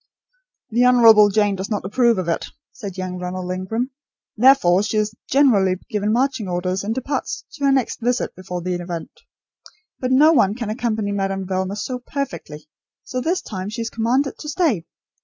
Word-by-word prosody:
"The 240 +3 +3
Honourable 225 -4 +7
Jane 205 -1 +2
does 190 +1 -5
not 205 -4 -2
approve 235 +2 +2
of 185 -2 -2
it," 165 - -1 0.2
said 200 -6 -8
young 185 -1 -4
Ronald 180 0 -4
Ingram; 220 +8 -3 0.4
"therefore 225 -7 +5
she 210 +1 -1
is 215 0 0 0.2
generally 220 -10 +4 0.2
given 210 0 0
marching 255 -2 0
orders 185 +2 -2
and 220 +3 -2
departs 260 +1 -3
to 285 -3 -3
her 275 - +4
next 265 -3 0
visit 245 +2 0
before 180 -1 -6
the 180 0 -1
event. 175 -1 -5 0.9
But 255 0 -2
no 295 +5 +6
one 210 -8 +3
can 230 -3 -4
accompany 220 -3 -1
Madame 195 -1 -2
Velma 190 +1 -2
so 250 +4 -4
perfectly, 245 - -6 0.4
so 255 - -4
this 345 +7 -1
time 190 -1 -5
she 230 +2 -4
is 230 - -5
commanded 250 +5 0
to 300 - -7
stay. 290 - 0
215 Hz, 175 wpm, -21 LUFS, 185-250 Hz, 0.9 s, Honourable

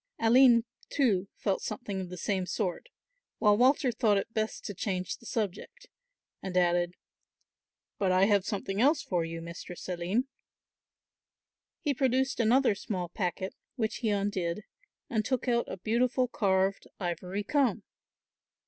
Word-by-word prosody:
Aline 235 0 +6 0.3
too 205 -9 +2
felt 195 -3 -1
something 205 -7 -4
of 180 - -6
the 180 - -7
same 185 +1 -1
sort, 205 - -2 0.5
while 210 -1 +5
Walter 255 +2 +4
thought 220 -3 +2
it 225 +3 -3
best 215 0 -2
to 205 - -4
change 185 -1 -3
the 235 - -14
subject, 235 - -4 0.6
and 185 -1 -3
added, 175 0 +2 1.0
"But 190 -2 +2
I 185 +1 +5
have 200 -2 +3
something 200 0 -2
else 290 +4 +4
for 175 -3 0
you, 165 0 -5
Mistress 170 +1 -8
Aline." 185 +8 -1 1.5
He 290 - +1
produced 265 0 +1
another 245 +1 +4
small 185 -3 -4
packet, 185 0 -3 0.2
which 220 -4 -1
he 230 - -1
undid, 200 -2 -1 0.4
and 220 -2 0
took 260 +2 -1
out 235 -1 +1
a - - -5
beautiful 240 +5 +1
carved 195 -3 +1
ivory 180 +2 -3
comb. 245 -5 +1
205 Hz, 140 wpm, -30 LUFS, 185-240 Hz, 1.5 s, Aline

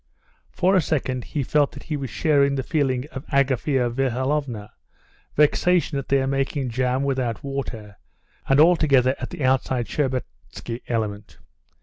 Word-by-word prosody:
For 185 +2 +2
a 185 - +5
second 130 -5 -2
he 145 - -2
felt 145 +2 +1
that - - -10
he 155 - -3
was 135 -3 -4
sharing 140 +2 +2
the 135 - -2
feeling 135 -5 0
of 135 - -7
Agafea 135 -1 +1
Mihalovna, 130 -3 -1 0.6
vexation 150 0 +2
at 135 - -7
their 135 -1 +3
making 135 -1 -1
jam 130 +2 0
without 130 -4 -1
water, 125 -7 -5 0.5
and 135 +1 +5
altogether 150 -6 +5
at - - -5
the 175 -6 -6
outside 130 -2 +1
Shtcherbatsky 130 -3 -4
element. 105 -3 -3
135 Hz, 140 wpm, -23 LUFS, 125-145 Hz, 0.6 s, a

